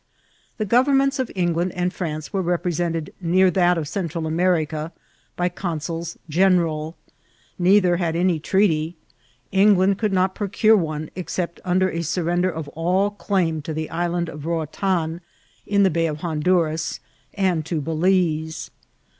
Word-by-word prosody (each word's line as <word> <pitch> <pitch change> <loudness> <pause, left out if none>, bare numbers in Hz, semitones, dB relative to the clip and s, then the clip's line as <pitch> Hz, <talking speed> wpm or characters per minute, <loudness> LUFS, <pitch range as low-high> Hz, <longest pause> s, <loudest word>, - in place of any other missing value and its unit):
The 215 - -1
governments 270 +4 +3
of 255 - -1
England 175 0 0
and 180 +1 -1
France 155 -1 -5
were 195 - +1
repre 175 0 -1
sented 165 -2 -2
near 185 +2 +3
that 180 -1 +3
of 155 -3 -3
Central 170 -2 -3
America 160 -2 0 0.4
by 180 - 0
consuls 170 -2 -4
general. 165 -2 +2 0.6
Neither 180 -1 +4
had 170 -2 -1
any 175 -1 +2
treaty; 165 -2 +1 0.6
England 195 0 +4
could 215 -2 0
not 185 0 +2
procure 215 +2 +3
one 155 -5 -2
except 175 -1 -4
upon 185 +1 +1
a 175 -3 0
surrender 175 +2 0
of 160 -4 -5
all 180 +6 0
claim 180 -6 -1
to 155 +1 -5
the 155 0 -3
Isl 175 +1 -1
and 170 -1 -1
of 150 -1 -8
Roatan, 170 +1 -1 0.5
in 200 0 +3
the 190 - +4
Bay 165 0 +1
of 150 -1 -5
Honduras, 160 -1 0 0.4
and 185 -5 +1
to 165 -2 -1
Ba 150 +3 -4
lize. 160 -2 0
175 Hz, 150 wpm, -22 LUFS, 160-185 Hz, 0.6 s, Neither